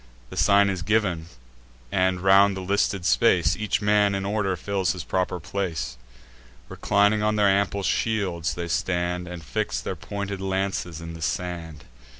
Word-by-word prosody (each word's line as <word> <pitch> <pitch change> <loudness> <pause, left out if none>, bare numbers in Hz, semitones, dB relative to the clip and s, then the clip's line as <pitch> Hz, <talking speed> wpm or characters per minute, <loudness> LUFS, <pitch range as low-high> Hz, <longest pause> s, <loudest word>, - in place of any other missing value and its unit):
The - - -7
sign 100 0 +4
is 95 -2 -4
giv'n; 95 -4 0 0.7
and, 95 -1 +1
round 95 +1 +5
the - - -4
listed 100 -1 0
space, 90 -8 +3
Each 105 -1 -1
man 105 -1 +3
in 95 0 -3
order 100 -2 0
fills 95 0 -1
his 90 -3 -6
proper 90 -1 -1
place. 90 -6 -3 0.7
Reclining 105 +1 +2
on 105 0 +1
their 105 -1 +3
ample 100 0 +1
shields, 95 -8 -1
they 85 -1 -4
stand, 90 -1 -1
And 90 -2 -8
fix - - -2
their - - -4
pointed 100 -1 -5
lances 95 -3 -2
in 85 0 -7
the 80 - -10
sand. 85 -1 -4
95 Hz, 155 wpm, -25 LUFS, 90-100 Hz, 0.7 s, round